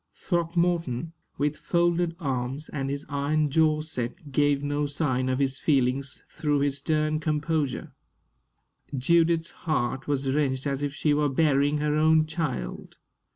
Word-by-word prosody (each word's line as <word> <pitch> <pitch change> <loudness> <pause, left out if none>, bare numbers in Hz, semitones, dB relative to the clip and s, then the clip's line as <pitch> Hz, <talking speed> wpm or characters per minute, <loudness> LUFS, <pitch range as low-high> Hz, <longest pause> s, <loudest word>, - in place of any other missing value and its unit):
Throckmorton, 170 -4 0 0.2
with 145 +1 0
folded 175 -1 +1
arms 135 0 -3
and 135 -2 -3
his 140 +1 -4
iron 145 +1 0
jaw 155 0 +3
set, 145 -1 -5
gave 145 0 +2
no 145 0 0
sign 130 -3 -1
of 130 - +1
his 135 -1 0
feelings 140 -1 0
through 145 -2 0
his 140 0 0
stern 155 +1 0
composure. 150 -2 -1 1.0
Judith's 165 +4 +2 0.2
heart 135 -3 0
was 140 -2 0
wrenched 135 -1 0
as 140 -1 -1
if 145 -1 -1
she 150 +1 +1
were 145 0 +2
burying 145 0 +2
her 150 0 0
own 155 0 +4
child. 160 -4 -4
145 Hz, 140 wpm, -26 LUFS, 135-160 Hz, 1.0 s, own